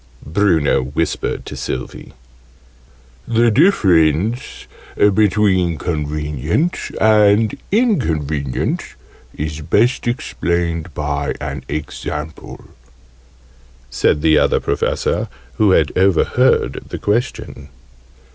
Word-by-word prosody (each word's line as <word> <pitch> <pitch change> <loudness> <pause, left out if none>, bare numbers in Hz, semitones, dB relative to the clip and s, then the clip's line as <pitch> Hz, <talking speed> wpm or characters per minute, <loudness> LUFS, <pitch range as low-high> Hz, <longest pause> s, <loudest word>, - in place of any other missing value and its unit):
Bruno 80 -4 +2
whispered 70 +5 -2
to - - -7
Sylvie. 65 - -6 1.1
"The 115 0 +3
difference 105 - +2 0.3
between 100 -4 +2
'convenient' 75 - -2
and 105 0 +4 0.2
'inconvenient' 80 - -1 0.4
is 75 +1 -4
best 120 - +1
explained 85 -7 -2
by 70 -1 -2
an - - -5
example," 75 +1 -6 1.3
said 75 +3 +1
the 80 -1 +5
Other - - +2
Professor, - - -1 0.3
who 105 - +3
had 80 -5 +2
overheard 95 -2 +2
the - - -5
question. 105 - -3
85 Hz, 80 wpm, -18 LUFS, 75-105 Hz, 1.3 s, the